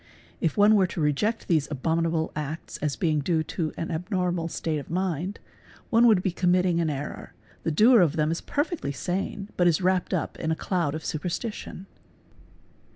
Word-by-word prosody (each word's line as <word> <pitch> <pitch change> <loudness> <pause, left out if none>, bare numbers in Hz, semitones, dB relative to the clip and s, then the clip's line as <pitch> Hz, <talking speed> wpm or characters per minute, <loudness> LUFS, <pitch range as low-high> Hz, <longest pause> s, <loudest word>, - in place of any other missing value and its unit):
If 165 - -1
one 205 +1 +6
were 190 -3 +4
to 175 - -6
reject 160 +10 0
these 155 -4 +2
abominable 160 +3 0
acts 150 +2 -5
as 150 -2 -2
being 155 -4 +1
due 160 +2 +1
to 160 0 -3
an 165 - -3
abnormal 180 0 -1
state 160 -2 -2
of 140 - -10
mind, 180 +1 -2 0.5
one 235 +1 +6
would 205 -5 +4
be 190 - +1
committing 180 0 +2
an 165 - 0
error, 145 -1 -6 0.3
the - - -1
doer 220 +8 +6
of 160 -3 +2
them 155 -1 +1
is 165 - -2
perfectly 290 - -2
sane 195 +5 -3
but 175 - +4
is 165 -3 +3
wrapped 185 0 +1
up - - -2
in 160 - -2
a 160 - +1
cloud 165 -4 -1
of 155 - -6
super 160 +3 -2
tition. 210 -1 -5
170 Hz, 185 wpm, -26 LUFS, 155-185 Hz, 0.5 s, one